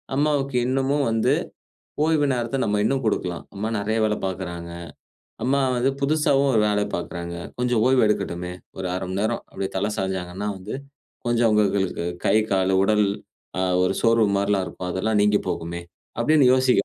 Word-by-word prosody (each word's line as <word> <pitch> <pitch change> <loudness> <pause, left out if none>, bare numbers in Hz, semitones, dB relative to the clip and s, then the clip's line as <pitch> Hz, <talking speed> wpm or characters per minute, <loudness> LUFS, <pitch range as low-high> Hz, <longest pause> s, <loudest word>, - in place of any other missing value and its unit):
அம்மாவுக்கு 140 -2 +1
இன்னமும் 135 +2 +1
வந்து 115 0 +2 0.7
ஓய்வு 160 -2 +3
நேரத்த 120 +1 -2
நம்ம 105 0 +1
இன்னும் 135 +3 +1
குடுக்கலாம். 90 -5 -1
அம்மா 105 +3 -2
நெறைய 110 +2 -1
வேலை 105 0 0
பார்க்குறாங்க, 85 -2 -5 0.7
அம்மா 140 +2 +2 0.2
வந்து 125 +2 +2
புதுசாவும் 140 -1 +2
ஒரு 110 - +4
வேல 105 0 +1
பார்க்குறாங்க. 85 0 -5 0.2
கொஞ்சம் 120 -3 +2
ஓய்வு 130 -2 +4
எடுக்கட்டுமே. 90 -4 -2 0.3
ஒரு 95 - -2
அரமணிநேரம் 100 +5 -2
அப்டியே 95 - -4
தல 100 +3 0
சாஞ்சாங்கன்னா 95 +1 -3
வந்து 95 - -6 0.5
கொஞ்சம் 120 0 +3
அவங்களுக்கு 100 -4 +1 0.2
கை, - - +4 0.2
கால், 95 0 +2
உடல் 105 +1 +3 0.8
ஒரு 95 - +2
சோர்வு 115 -2 +4
மாரியெல்லாம் 100 -1 +1
இருக்கும். 90 -1 -6
அதெல்லாம் 105 +2 +1
நீங்கிப் 105 0 +2
போகுமே. 85 +1 -3 0.4
அப்படின்னு 155 -3 +4
யோசிக்க 130 -6 +3
105 Hz, 145 wpm, -23 LUFS, 95-125 Hz, 0.8 s, ஒரு